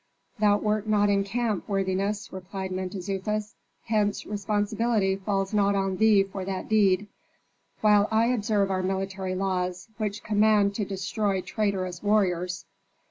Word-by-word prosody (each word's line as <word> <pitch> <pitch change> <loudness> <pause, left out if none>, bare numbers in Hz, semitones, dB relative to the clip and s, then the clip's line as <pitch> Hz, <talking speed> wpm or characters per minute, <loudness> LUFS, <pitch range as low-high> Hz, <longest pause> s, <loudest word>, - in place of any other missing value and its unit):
"Thou 205 -1 +4
wert 210 0 -1
not 205 -1 +3
in 200 0 +2
camp, 215 0 -2
worthiness," 195 +1 -1
replied 190 0 -6
Mentezufis, 195 +3 -3 0.3
"hence 210 -2 0
responsibility 210 0 0
falls 195 0 -2
not 200 -1 +3
on 195 -1 0
thee 215 -2 +5
for 195 -1 -6
that 190 0 -4
deed: 205 -2 +3 0.8
while 210 -1 +5
I 220 +1 +3
observe 210 -4 +1
our 185 -1 0
military 190 0 -2
laws, 185 0 -2
which 210 -2 -3
command 210 -1 +3
to 205 0 -2
destroy 195 0 -1
traitorous 185 -4 -2
warriors. 180 -4 +1
200 Hz, 135 wpm, -26 LUFS, 190-210 Hz, 0.8 s, thee